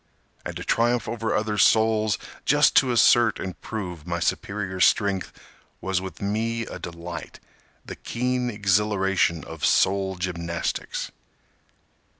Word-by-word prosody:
And - - -6
to - - -6
triumph 120 +1 +1
over 115 -1 -2
other 105 -1 -1
souls, 110 -3 +3 0.3
Just - - +4
to 130 - +5
assert 120 -1 +4
and 95 -2 -6
prove 90 -7 -6
my 85 0 -2
superior 95 +3 -2
strength, 100 0 +2 0.5
Was 95 -1 -1
with 95 +1 -8
me 115 +3 -1
a - - -8
delight, 85 0 -8 0.5
The - - -8
keen 125 +1 -2
exhilaration 95 -5 +1
of 80 -2 -10
soul 95 0 +2
gymnastics. 85 -2 -3
100 Hz, 125 wpm, -24 LUFS, 90-110 Hz, 0.5 s, to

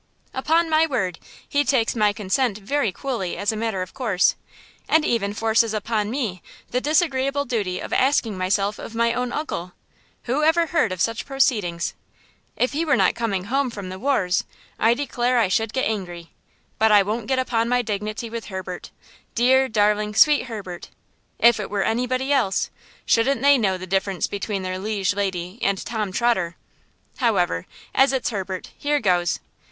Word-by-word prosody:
"Upon 325 +5 +2
my 320 0 +3
word, 190 - -2 0.3
he 290 0 +2
takes 245 -4 +1
my 210 -2 +3
consent 210 +2 0
very 220 +2 0
coolly 195 -4 -3
as 205 +1 0
a - - -4
matter 215 -4 -1
of 185 - -11
course, 210 -8 +2 0.6
and 315 -1 +4
even 205 -4 0
forces 225 +1 +2
upon 215 0 -1
me 220 -8 -3 0.3
the 250 - 0
disagreeable 285 -3 +1
duty 205 -8 -2
of - - -6
asking 255 -5 +2
myself 195 +2 0
of 230 - -8
my 235 0 +2
own 250 0 -2
uncle! 180 - -4 0.5
Who 260 +5 0
ever 325 +2 +4
heard 325 - +1
of 185 -1 -4
such 230 0 -1
proceedings? 210 -11 0 0.6
If 250 - +1
he 310 +3 0
were 300 -4 +3
not 190 -5 +3
coming 200 -6 -2
home 265 +5 0
from 200 -5 -7
the 185 +1 -7
wars, 195 -9 +1 0.4
I 230 +2 +4
declare 250 -2 0
I 225 -6 +3
should 220 +3 +1
get 260 - 0
angry; 175 -6 -5 0.5
but 220 0 +4
I 205 -1 +7
won't 215 +2 -3
get 265 - +1
upon 235 -3 0
my 245 0 +2
dignity 215 +2 -3
with 230 0 -6
Herbert–dear, 235 +7 -1
darling, 210 0 +1
sweet 295 +1 +5
Herbert. 195 -6 -7 0.5
If 235 -1 +5
it 210 - -4
were 200 -1 0
anybody 255 +5 0
else, 230 -9 +1 0.3
shouldn't 245 +2 +2
they 285 0 +7
know 195 -7 +1
the 185 - -7
difference 190 0 0
between 200 -1 -3
their 185 0 -3
liege 200 -1 -1
lady 190 0 -3
and 195 0 +1
Tom 215 -1 -3
Trotter? 190 -6 +1 0.6
However, 185 - +1 0.3
as 270 +1 +4
it's 265 -2 -1
Herbert, 190 -3 -5
here 295 0 0
goes! 180 -6 +1
220 Hz, 170 wpm, -23 LUFS, 195-255 Hz, 0.6 s, I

